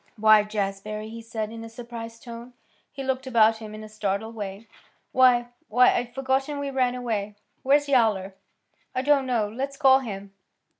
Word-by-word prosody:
"Why, 215 -1 +6
Jazbury!" 210 +1 -4
he 230 0 -8
said 220 -1 -4
in 225 0 -8
a 225 - -8
surprised 230 -1 -9
tone. 235 +1 -9 0.4
He 275 - -6
looked 265 0 -2
about 225 -3 +4
him 215 -1 -9
in 215 - -8
a - - -8
startled 215 +1 -3
way. 205 0 -7 0.4
"Why 245 -2 +4 0.2
why 250 +3 +5
I'd 245 0 -3
forgotten 270 +2 0
we 285 -1 -3
ran 255 -2 +1
away. 215 -5 -3 0.3
Where's 290 +2 +3
Yowler?" 215 -8 +2 0.6
"I 255 - 0
don't 280 -2 +3
know. 230 -4 +1
Let's 270 +6 -5
call 265 -2 +6
him." 200 -5 -7
230 Hz, 170 wpm, -25 LUFS, 215-260 Hz, 0.6 s, Why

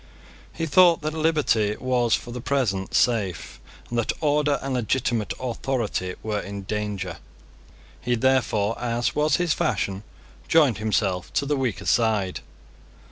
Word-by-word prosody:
He 165 - -3
thought 170 +2 +5
that 155 0 -2
liberty 150 -10 +1
was 125 -2 +2
for 120 - -7
the 125 0 -6
present 115 -9 -1
safe, 105 -8 0 0.3
and 120 - -2
that 120 - 0
order 150 -1 +2
and 135 -1 -2
legitimate 120 -2 0
authority 120 -7 -2
were 105 -1 -1
in 100 0 -6
danger. 100 -3 -3 0.8
He 120 0 0
therefore, 115 -4 +1
as 120 0 -1
was 150 +1 +2
his 175 -3 +1
fashion, 100 - -1 0.5
joined 145 -11 +4
himself 100 -4 -1
to 140 - +1
the 145 +1 0
weaker 115 -8 -2
side. 110 -5 +1
120 Hz, 135 wpm, -24 LUFS, 105-140 Hz, 0.8 s, thought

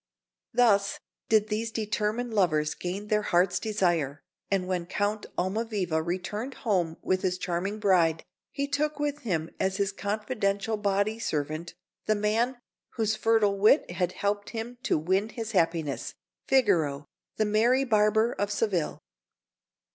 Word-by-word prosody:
Thus 200 -5 +3 0.3
did 215 -1 +3
these 220 +2 -1
determined 220 +2 -2
lovers 155 -7 +2
gain 185 +3 -5
their 210 0 +1
hearts' 180 -2 +2
desire; 175 -10 0 0.3
and 190 -2 0
when 180 -2 -2
Count 205 +3 -1
Almaviva 190 -4 -1
returned 190 +9 -3
home 175 -7 +1
with 185 0 +1
his 185 -2 0
charming 185 +3 -2
bride, 175 -6 +3 0.3
he 280 0 -2
took 290 +1 -1
with 290 0 -1
him 170 - -2
as 190 0 0
his 200 -1 +1
confidential 205 0 -1
body 205 +1 0
servant 155 -1 -3 0.3
the 215 - +3
man 225 +5 +1 0.4
whose 220 -2 0
fertile 215 -2 +2
wit 215 - +4
had 180 0 -1
helped 205 0 -1
him 235 +1 -6
to - - +1
win 190 +7 +1
his 225 0 -5
happiness 165 -6 0 0.3
Figaro, 170 - +2 0.3
the 215 - +2
merry 235 +6 +3
Barber 220 -1 +3
of 205 -3 -2
Seville. 195 -6 -1
205 Hz, 140 wpm, -28 LUFS, 180-220 Hz, 0.4 s, wit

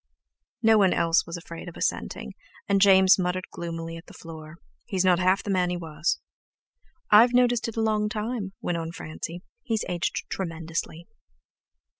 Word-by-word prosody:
No 220 -1 +6
one 190 -3 +4
else 165 0 +2
was 170 +1 -5
afraid 170 0 -9
of 170 - -12
assenting, 65 - -3 0.3
and 200 -1 +2
James 190 -1 +6
muttered 180 0 -1
gloomily 165 -1 -5
at 165 - -13
the - - -14
floor: 160 -1 -10 0.3
"He's 190 -1 0
not 180 -1 +4
half 185 +1 +2
the 205 - -3
man 180 -2 +2
he 180 - -2
was." 160 0 -2 0.9
"I've 230 +4 +7
noticed 245 -2 +3
it 230 - -6
a - - +1
long 215 -1 +1
time," 210 -2 -3
went 175 -1 -1
on 165 0 -5
Francie; 170 +2 -7 0.2
"he's 225 - -2
aged 175 -2 -2
tremendously." 165 -1 -4
180 Hz, 165 wpm, -26 LUFS, 165-205 Hz, 0.9 s, I've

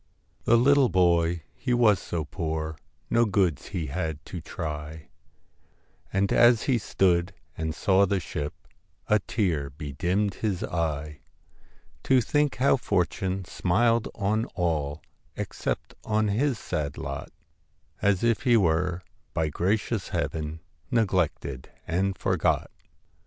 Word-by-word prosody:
The 120 - +5
little 135 +1 +5
boy 85 -2 +2
he 125 -2 -1
was 110 -6 +5
so 85 -3 -3
poor, 80 -2 -3 0.4
No 115 - +5
goods 95 - +1
had 80 -2 -3
he - - -17
to - - -5
try, 75 0 -6 1.0
And 100 0 +1
as 120 -1 +6
he 130 -4 +2
stood 90 -2 +1 0.2
and 80 0 -3
saw 100 -1 +3
the 100 0 +1
ship, 75 -3 -4 0.5
A 105 - +5
tear 90 -8 -1
bedimmed 90 +8 -1
his 100 -5 -1
eye, 75 -3 -2 0.9
To 130 -1 +5
think 145 +4 +1
how 135 +1 +3
fortune 95 -3 -1
smiled 115 +7 +2
on 110 +3 0
all 80 -5 -1 0.3
Except - - -3
on 110 -1 +1
his 125 +5 +1
sad 75 -8 -3
lot 70 0 -5 0.7
As 100 -1 +2
if 115 -1 +2
he 120 -2 +4
were 90 -1 +1 0.3
by 80 -1 +1
gracious 95 +8 0
Heaven 80 0 -3 0.3
Neglected 90 - 0 0.2
and 95 +3 0
forgot! - - +1
90 Hz, 125 wpm, -27 LUFS, 80-110 Hz, 1.0 s, as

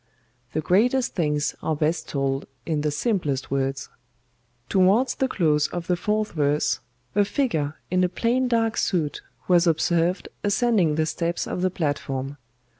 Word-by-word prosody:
The 155 - 0
greatest 235 - +2
things 150 -4 0
are 160 - 0
best 160 +2 -1
told 135 -1 -1 0.2
in 155 -2 -1
the 150 - 0
simplest 150 - -1
words. 135 0 -1 0.8
"Towards 200 +7 +3
the 265 - 0
close 150 - +2
of 175 -1 -5
the 180 - +1
fourth 210 +4 -1
verse, 150 -1 +1 0.3
a 205 - +4
figure 180 - -1 0.2
in 185 0 +3
a 180 - +2
plain 240 +6 +1
dark 230 -2 +1
suit 160 -7 0 0.3
was 175 -1 +4
observed 170 +2 +1 0.2
ascending 205 -6 +2
the 160 0 +1
steps 170 +2 -2
of 180 - -3
the 185 - +2
platform. 145 -4 -3
170 Hz, 150 wpm, -24 LUFS, 150-205 Hz, 0.8 s, a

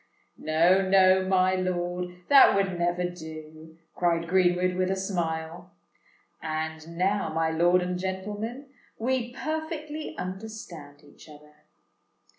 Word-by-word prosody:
"No—no, 185 +4 +4
my 185 0 +3
lord; 180 -1 -3
that 275 -6 +7
would 195 -2 +1
never 175 +1 0
do!" 160 -2 -10 0.2
cried 170 -1 0
Greenwood, 180 0 +2
with 185 0 0
a 190 - +1
smile. 170 -4 -3 0.7
"And 160 +1 -5
now, 190 -2 0
my 160 0 0
lord 175 +2 +3
and 180 0 -3
gentlemen, 205 +7 -4 0.3
we 245 +1 -1
perfectly 310 +1 -5
understand 180 -7 -8
each 145 +2 -17
other. 150 0 -15
180 Hz, 110 wpm, -27 LUFS, 160-190 Hz, 0.7 s, that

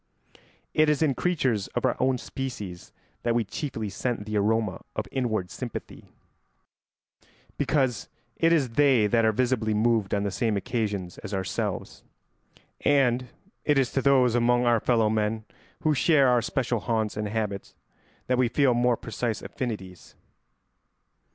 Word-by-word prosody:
It 155 0 +4
is 150 +1 +2
in 145 -3 +2
creatures 130 - 0
of - - +1
our - - +2
own 130 0 +2
species 105 -10 -6 0.3
that 120 -1 0
we 120 - +2
chiefly 110 +1 -4
scent 115 +1 -3
the 110 0 -4
aroma 105 -1 +1
of - - -2
inward 110 -9 -1
sympathy, - - -7 1.5
because 130 -8 0 0.3
it 165 - +3
is 150 -7 +3
they 130 -2 +4
that 115 +2 +3
are 110 - +4
visibly 110 -2 0
moved 110 -2 +2
on 100 - 0
the 100 - -1
same 110 -3 0
occasions 100 -5 -3
as 105 -2 -5
ourselves; 95 0 -3 0.8
and 130 -3 +3 0.4
it 150 -2 +2
is 130 -3 +2
to 135 - 0
those 130 -3 +4
among 120 +1 +3
our 120 -1 +4
fellow 115 -1 +2
men 110 0 -1 0.4
who 155 - +2
share 140 -1 +4
our 125 -1 +4
special 120 0 -1
haunts 110 -1 -1
and 105 0 -2
habits 105 -2 -3 0.5
that 125 0 +1
we 125 - +4
feel 135 +1 +3
more 120 0 +2
precise 115 0 -3
affinities. 105 -9 -6
120 Hz, 150 wpm, -26 LUFS, 105-130 Hz, 1.5 s, It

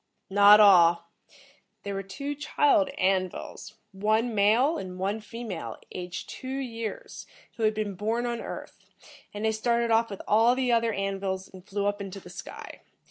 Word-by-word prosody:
"Not 205 +1 +8
all. 170 -4 +6 0.7
There 200 - -4
were 195 - -3
two 280 +10 -5
child 290 -7 +2
An 185 -1 +2
vils, 210 +3 -9 0.2
one 215 +4 0
male 230 +10 +3
and 185 -1 -7
one 195 +4 -2
female, 215 -4 -7
aged 180 -1 -6
two 265 0 -6
years, 230 -5 -6 0.3
who - - -6
had 215 0 +2
been 210 -2 -2
born 220 +5 -2
on 235 -1 -3
Earth, - - -8 0.5
and 210 +1 -4
they 220 - +3
started 235 +1 0
off 230 +1 +3
with 200 - -7
all 225 +3 +4
the 255 -1 0
other 230 -1 +2
An 195 -1 -2
vils 190 -1 -4
and 185 -1 -13
flew 200 +1 -3
up 205 0 -1
into 195 0 -7
the 180 - -13
sky. 185 - -9
210 Hz, 175 wpm, -27 LUFS, 195-230 Hz, 0.7 s, Not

